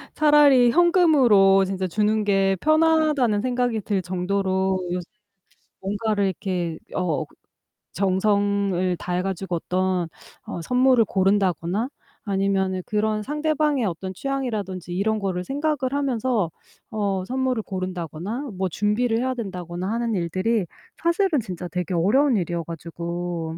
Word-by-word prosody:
차라리 290 -5 +6
현금으로 270 - +5
진짜 190 0 -2
주는 210 +4 +1
게 195 -1 +2
편하다는 310 - +3
생각이 245 -2 0
들 200 -1 -1
정도로 190 +1 0
요새는 180 0 -2 0.8
뭔가를 205 +1 -1
이렇게 180 -3 -3 0.2
어 165 -4 0 0.7
정성을 195 -1 +1
다해 180 +1 -2
가지고 190 -1 -3
어떤 185 0 -1 0.4
어 170 - -5
선물을 250 +1 +4
고른다거나 195 +1 +1 0.4
아니면은 195 -2 0
그런 215 0 0
상대방의 300 0 0
어떤 185 0 -4
취향이라든지 215 -9 -3
이런 215 +4 0
거를 185 -3 -2
생각을 290 - -1
하면서 255 - 0 0.4
어 200 -4 -1
선물을 255 +1 -1
고른다거나 185 - -5
뭐 190 0 0
준비를 215 +6 0
해야 260 +1 -1
된다거나 180 -5 -5
하는 230 -1 -1
일들이 185 +4 0 0.4
사실은 340 -2 +2
진짜 180 -5 -6
되게 180 0 -3
어려운 240 - +3
일이어 175 -3 -1
가지고 170 0 -5
200 Hz, 305 characters per minute, -23 LUFS, 185-245 Hz, 0.8 s, 차라리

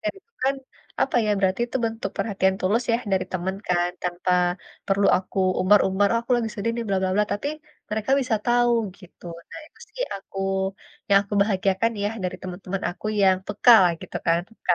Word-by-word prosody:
kayak 320 - -2
gitu 420 +4 -20
kan, 270 - +2 0.5
apa 270 - 0
ya, 210 - +1
berarti 190 +2 +1
itu 240 - -3
bentuk 225 0 -3
perhatian 190 -3 +1
tulus 210 +6 +1
ya, 230 - +4 0.2
dari 185 -1 +2
teman 185 +1 -2
kan, 175 0 +1
tanpa 180 +1 -2 0.6
perlu 200 0 +2
aku 185 +1 -5 0.2
umbar-umbar, 195 +1 +4
ah, 230 - +2
aku 235 - -18
lagi 230 -2 -1
sedih 230 +1 -1
nih, 235 -1 -3
bla 195 -1 0
bla 185 - +1
bla, 210 +1 +3
tapi 245 +8 -2 0.4
mereka 220 +4 -2
bisa 245 -4 0
tahu, 240 0 +3 0.3
gitu. 180 -2 -18 0.3
Nah - - -8
itu - - -24
sih - - -4
aku 195 0 -11 0.7
yang 200 0 +6
aku 205 +1 -6
bahagiakan 200 +2 +1
ya, 205 - +1 0.2
dari 180 - -2
teman-teman 185 +1 -5
aku 185 +4 -8
yang 190 -1 +5
peka 210 +4 +5
lah, 175 - +3
gitu - - -7
kan, 165 0 +3
peka. 200 -5 -1
200 Hz, 195 wpm, -24 LUFS, 185-230 Hz, 0.7 s, yang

